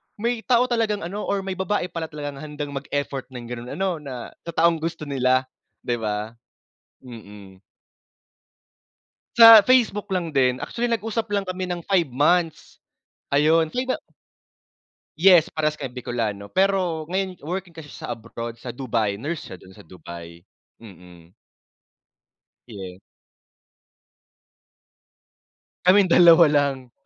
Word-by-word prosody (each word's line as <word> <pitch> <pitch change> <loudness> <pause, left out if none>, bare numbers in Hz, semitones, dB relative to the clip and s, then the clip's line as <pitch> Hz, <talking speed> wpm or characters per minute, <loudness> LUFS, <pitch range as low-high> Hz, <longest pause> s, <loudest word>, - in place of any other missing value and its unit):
may 235 +2 -2
tao 245 -1 +4
talagang 220 -5 0
ano, 195 +5 -5
or 200 -1 -1
may 190 -1 -5
babae 190 -1 -1
pala 165 -1 -4
talagang 145 -2 -7
handang 150 -1 -6
mag-effort 140 0 -4
ng 125 -1 -7
ganun 120 0 -7
ano, 190 -3 -1
na 130 -5 -8 0.2
sa 170 - -6
taong 165 0 +3
gusto 165 0 -4
nila, 130 -2 +1 0.4
di 120 -1 -2
ba? 105 0 -3 0.7
Mm. 105 -6 -13 1.8
Sa 230 -2 +11
Facebook 230 -3 +2
lang 175 -4 -2
din, 130 -2 +2
actually 240 - -3
nag-usap 225 -1 -2
lang 200 -1 -1
kami 185 0 -4
ng 175 -2 -5
5 175 -6 +1
months, 160 +6 0 0.5
ayon. 155 +3 +3
Sa 160 - -9
'yo 255 +1 -1
ba - - -3 1.2
Yes, 175 -2 +6
parehas 155 -1 -1
kami - - -4
Bicolano, 110 -5 -4
pero 185 -5 +1
ngayon 185 -1 -3
working 175 +3 -5
kasi 160 -2 -11
sya - - -9
sa - - -5
abroad, 115 0 -7
sa 125 - -8
Dubai. 115 -5 -2
Nurse 150 +8 -4
siya 95 - -9
dun 95 +1 -17
sa - - -14
Dubai, 85 0 -12 0.4
mm. 90 -4 -15 1.3
Yeah. 95 -5 -9 2.9
Kaming 185 0 +5
dalawa 170 -1 +8
lang. 140 -4 0
155 Hz, 135 wpm, -23 LUFS, 120-185 Hz, 2.9 s, Sa